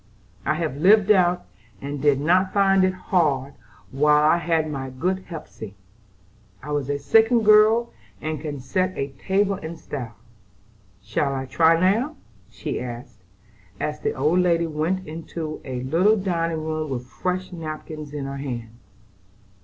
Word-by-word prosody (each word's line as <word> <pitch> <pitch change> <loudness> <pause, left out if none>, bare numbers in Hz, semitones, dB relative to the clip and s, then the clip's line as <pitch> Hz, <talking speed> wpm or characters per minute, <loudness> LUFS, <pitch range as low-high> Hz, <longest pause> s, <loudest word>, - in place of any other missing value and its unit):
I 155 - +2
have 155 -4 -3
lived 200 +5 +5
out, 180 -3 +3 0.3
and 140 0 -5
did 145 -2 +3
not 185 +5 +2
find 195 -1 +4
it 185 0 +2
hard 145 -7 0 0.4
while 150 +2 +4
I - - +4
had 165 -2 0
my 135 -3 -4
good 185 +9 -2
Hepsey. 110 - -9 0.9
I 150 - -6
was 145 -3 -1 0.2
second 225 - +4
girl, 215 +2 +5 0.3
and 155 +3 -4
can 145 -3 -5
set 185 +8 -1
a 140 - -2
table 195 +8 0
in 165 -3 -7
style. 125 -7 -7 0.9
Shall 135 +6 -1
I 135 0 -3
try 165 +5 +3
now?" 225 - +2 0.3
she - - -4
asked, 120 -1 -8 0.6
as 150 0 -3
the - - -1
old 155 +7 +2
lady 170 -2 +2
went 165 +4 -2
into 160 0 -6
a 125 -2 -5
little 180 +11 +3
dining 165 -4 -1
room 155 -1 -3
with 125 -2 -4
fresh 185 +8 -3
napkins 155 -2 -7
in 145 -2 -4
her 135 0 -5
hand. 120 -5 -5
160 Hz, 150 wpm, -23 LUFS, 140-185 Hz, 0.9 s, lived